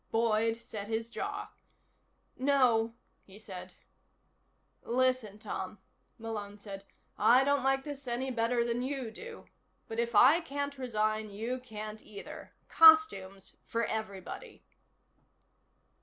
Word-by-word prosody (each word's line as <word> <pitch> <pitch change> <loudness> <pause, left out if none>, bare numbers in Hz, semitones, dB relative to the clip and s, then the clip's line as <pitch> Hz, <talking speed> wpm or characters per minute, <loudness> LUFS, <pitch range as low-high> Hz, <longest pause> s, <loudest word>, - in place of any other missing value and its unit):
Boyd 225 0 +1
set 210 -3 -7
his 225 +1 -3
jaw. - - -4 0.8
"No," 250 -4 +3 0.3
he 195 +1 -16
said. 185 -4 -9 1.1
"Listen, 255 -4 0
Tom," 215 - -5 0.4
Malone 210 -3 -6
said, 200 -1 -9 0.3
"I 250 +3 +6
don't 280 -1 +2
like 270 0 +2
this 280 -2 -7
any 250 +2 -2
better 235 0 +1
than 235 +1 -1
you 260 -3 -3
do. 455 - -10 0.4
But 225 0 -4
if 235 -1 -1
I 270 +10 +7
can't 285 -3 -4
resign, 215 -3 -1
you 225 +5 -4
can't 215 -3 -8
either. 200 - -10 0.2
Costumes 200 -13 +5
for 230 0 0
everybody." 220 - -6
230 Hz, 115 wpm, -31 LUFS, 215-260 Hz, 1.1 s, I